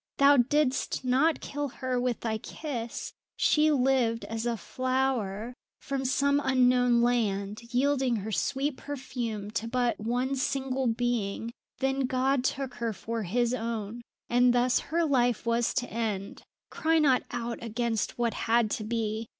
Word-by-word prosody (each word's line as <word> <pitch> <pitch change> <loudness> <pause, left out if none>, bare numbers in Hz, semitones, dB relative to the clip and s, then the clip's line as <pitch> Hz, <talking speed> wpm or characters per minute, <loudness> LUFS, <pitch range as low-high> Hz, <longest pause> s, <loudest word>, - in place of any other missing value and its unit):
"Thou 280 0 +6
didst 260 +1 +1
not 275 +6 +2
kill 290 0 -3
her 255 -1 -2
with 250 -2 -1
thy 220 -2 -2
kiss; 240 -3 -5 0.2
she 305 0 +4
lived 255 -5 +2
as 225 +1 -3
a 235 -1 -1
flower 250 -1 -1 0.3
from 275 -1 -3
some 280 +2 +2
unknown 250 -2 +4
land, 210 -4 0
yielding 265 -1 +2
her 215 0 -4
sweet 275 +6 -1
perfume 240 -7 -5
to 225 +1 -2
but 245 0 0
one 245 +5 -1
single 265 -1 -1
being; 230 -2 -1 0.3
then 270 0 +1
God 260 +1 +1
took 265 -1 -2
her 230 -2 0
for 230 +3 -4
His 235 +5 0
own, 225 -1 -3 0.3
and 245 0 +4
thus 245 +1 +3
her 335 +2 +2
life 245 -6 +1
was 235 0 +1
to 245 -2 0
end. 215 -4 -3 0.3
Cry 325 +1 +1
not 280 -5 +4
out 235 -1 -4
against 230 -1 -2
what 235 -1 0
had 230 -1 +1
to 215 - -2
be. 220 0 -2
245 Hz, 150 wpm, -28 LUFS, 230-265 Hz, 0.3 s, Thou